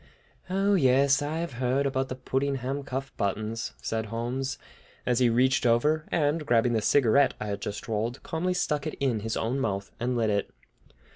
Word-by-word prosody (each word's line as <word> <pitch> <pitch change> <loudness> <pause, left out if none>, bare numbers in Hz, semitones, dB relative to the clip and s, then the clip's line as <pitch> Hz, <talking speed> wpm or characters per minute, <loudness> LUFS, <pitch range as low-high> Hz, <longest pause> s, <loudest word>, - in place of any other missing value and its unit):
"Oh, 195 +2 +2
yes; 135 -4 +4
I 150 +2 -2
have 170 -4 -3
heard 130 +3 +1
about 135 -1 -1
the 130 - -3
Puddingham 135 +1 -2
cuff 135 0 -5
buttons," 110 +3 -2
said 110 0 -2
Holmes, 125 +4 -3 0.5
as 125 -1 +2
he 125 -2 +4
reached 130 +4 +3
over, 150 +7 +2
and 150 0 +1
grabbing 120 -3 +2
the 110 - +1
cigarette 135 +4 +4
I - - -4
had 100 -1 -4
just 105 0 -5
rolled, 115 +3 -2
calmly 180 +3 -1
stuck 150 -4 -1
it 155 - -4
in 130 -6 +1
his 110 +1 -3
own 120 +5 -1
mouth, 100 -5 -2
and 125 +1 -1
lit 110 -2 +2
it. 100 -1 0
130 Hz, 185 wpm, -27 LUFS, 115-140 Hz, 0.5 s, yes